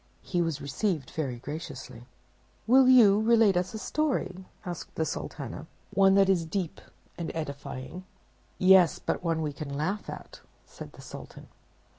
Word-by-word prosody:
He 175 -2 -1
was 165 -4 -1
received 150 +2 -2
very 140 -6 -3
graciously. 130 -3 -8 0.6
"Will 255 +2 +6
you 215 -5 +7
relate 225 -3 +4
us 180 +4 -1
a - - -3
story?" 215 -9 -2 0.2
said 175 -3 -6
the 160 - 0
Sultana; - - -6 0.3
"one 195 0 +5
that 195 -1 +5
is 185 -3 +3
deep 170 +1 -4 0.4
and 170 - -3
edifying." 140 +1 -6 0.5
"Yes, 185 -3 +6
but - - -3
one 165 -2 0
that 160 - -2
we 150 -1 -2
can 145 0 -7
laugh 165 +9 -2
at," - - -9 0.3
said - - -11
the - - -13
Sultan. - - -11
175 Hz, 155 wpm, -28 LUFS, 155-200 Hz, 0.6 s, you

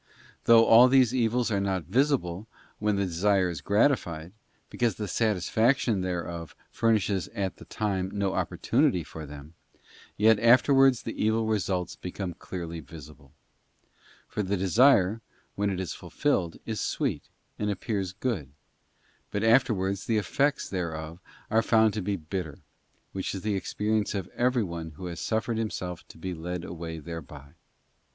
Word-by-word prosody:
Though 115 -1 +7
all 120 +3 +8
these 130 -2 +4
evils 120 -1 +1
are 100 - +1
not 95 -3 -1
visible 115 - 0
then - - -28
when 105 -1 +1
the 100 0 0
desire 95 +1 +2
is 80 -4 -6
gratified, 90 - +1 0.4
because 120 -5 0
the 105 - -4
satisfaction 110 +2 +1
thereof 85 -3 -4 0.2
furnishes 105 -4 +1
at 95 -4 -2
the - - -12
time 95 -3 -2
no 100 -2 -1
opportunity 125 - +1
for 80 0 -9
them, 75 +2 -11 0.6
yet 110 0 +5
afterwards 130 +2 +5
the 115 - -4
evil 110 +1 +2
results 95 -4 -1
become 90 0 -5
clearly 85 -1 -6
visible. 75 -1 -13 1.0
For 105 - -3
the 100 0 -1
desire, 110 +1 +4 0.3
when 100 0 0
it 95 -2 -2
is 90 -5 -3
fulfilled, 95 - -1
is 110 -2 -3
sweet, - - -2 0.3
and 105 - 0
appears 100 -1 -2
good, 95 - -3 0.8
but 105 - -2
afterwards 110 -5 +2
the 115 - +2
effects 135 +9 0
thereof 85 -3 -4 0.3
are 110 - +4
found 110 -2 +3
to 105 - -2
be 100 +2 -1
bitter, 80 -2 -5 0.5
which 95 +1 -3
is 95 - -6
the 105 -1 0
experience 105 +3 -1
of 95 -3 -3
everyone 95 -11 -1
who 85 +5 -9
has 85 -2 -5
suffered 110 +1 -1
himself 90 -5 -4
to - - -14
be 90 +3 -4
led 85 +1 -5
away 80 -1 -6
thereby. 75 -3 -9
100 Hz, 150 wpm, -27 LUFS, 85-110 Hz, 1.0 s, all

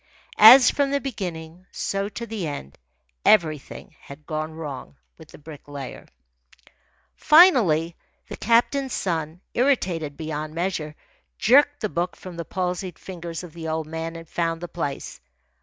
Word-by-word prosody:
As 245 +4 +10
from 285 -1 0
the 280 0 0
beginning, 180 -8 -6
so 195 +1 -3
to 235 +3 -6
the 215 -7 -4
end, 70 - -7 0.4
everything 155 -9 +1
had 140 +2 -13
gone 155 0 -4
wrong 140 - -8 0.2
with - - -13
the - - -13
Bricklayer. 145 -3 -10 1.1
Finally, 230 - +5 0.3
the - - -7
captain's 250 +4 +1
son, 165 -1 -3
irritated 180 - 0
beyond 155 -1 -5
measure, 165 -4 -3 0.4
jerked 290 +5 +4
the 215 - 0
book 175 +1 -2
from 185 -2 -10
the 170 0 -6
palsied 180 -1 -3
fingers 170 -2 -7
of 170 -3 -11
the 165 -1 -7
old 160 0 -2
man 160 +1 -5
and 165 0 -10
found 165 0 -2
the 175 - -6
place. 145 - -5
170 Hz, 140 wpm, -24 LUFS, 155-210 Hz, 1.1 s, As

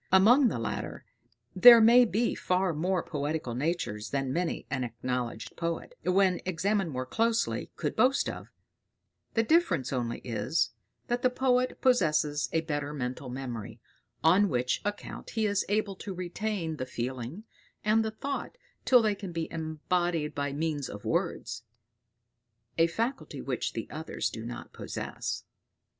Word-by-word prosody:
Among 235 +9 +7
the 210 - -1
latter 115 - -4 0.5
there 235 +5 +10
may 235 +3 +7
be 230 +2 +1
far 185 -1 0
more 175 +3 0
poetical 150 -4 -3
natures 130 -6 -2
than 135 -2 -1
many 175 0 -1
an 135 -2 0
acknowledged 120 -1 -4
poet, 170 - -3
when 185 0 +3
examined 190 +1 0
more 130 -3 -3
closely, 230 - 0
could - - -2
boast 260 +2 +3
of; - - -6 0.9
the 225 - +4
difference 205 - +2
only 120 -2 -1
is, 130 +7 0 0.3
that 240 0 -1
the 255 - +4
poet 255 0 +1
possesses 155 - +2
a 160 - +2
better 145 -2 -3
mental 130 0 -4
memory, 125 -4 -6 0.4
on 185 +5 +5
which 125 -1 0
account 205 0 -5
he 220 - +3
is 205 -1 +1
able 205 -1 0
to 195 -1 -6
retain 180 -2 -3
the 130 - -4
feeling 125 - -4 0.4
and 220 +1 +4
the 220 - -1
thought 275 - -5 0.3
till 250 -3 +6
they 215 -1 +2
can 200 -2 -7
be 165 -1 -2
embodied 165 0 -1
by 145 0 -2
means 145 -2 -2
of 105 0 -9
words; - - -1 1.1
a 165 0 +4
faculty 230 +10 -3
which - - -2
the - - -4
others - - -3
do - - -6
not - - -8
possess. - - -4
170 Hz, 150 wpm, -29 LUFS, 140-215 Hz, 1.1 s, there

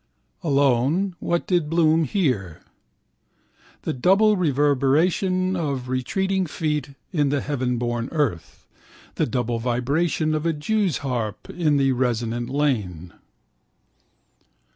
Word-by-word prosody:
Alone, 145 +5 +2
what 170 0 -1
did 175 -5 +1
Bloom 165 -1 +3
hear? 125 - -1 1.2
The - - -2
double 195 - +4
reverberation 165 +5 +2
of 140 -7 -3
retreating 190 +9 -1
feet 150 -3 -3 0.2
on 145 -3 +2
the 145 0 +1
heavenborn 125 -4 -2
earth, 120 - -2 0.5
the - - 0
double 120 -1 -1
vibration 140 +7 0
of 155 -1 -1
a 165 - +1
jew's 185 +3 0
harp 115 -5 -3
in 155 -5 +1
the 135 -1 +3
resonant 120 -1 -1
lane. 105 - -1
145 Hz, 105 wpm, -23 LUFS, 125-165 Hz, 1.2 s, double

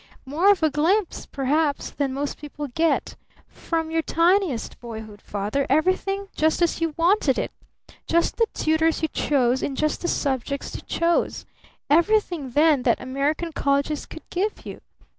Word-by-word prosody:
More 315 +9 +2
of 400 -5 +4
a 310 - +3
glimpse, 340 +7 0
perhaps, 285 +2 0
than 280 -2 -1
most 280 +2 -3
people 295 0 -6
get. 320 +6 0 0.3
From 325 -1 -3
your 325 0 +1
tiniest 335 - +1
boyhood, 220 -3 -9
Father, 210 +7 -2
everything 375 +7 +1
just 315 0 +2
as 335 -1 0
you 325 -2 -1
wanted 335 -6 +3
it! - - -2 0.6
Just 335 +1 +1
the 460 - +3
tutors 320 +1 +1
you - - +3
chose 260 -4 +1
in 275 - -2
just 305 +2 -1
the 345 - -2
subjects 275 -2 -2
you - - -6
chose! 335 0 0 0.4
Everything 340 -2 +2
then 295 +1 +4
that 240 -2 +2
American 285 +6 -2
colleges 280 0 0
could 320 - -11
give 405 +4 -2
you! - - -8
310 Hz, 155 wpm, -24 LUFS, 275-335 Hz, 0.6 s, of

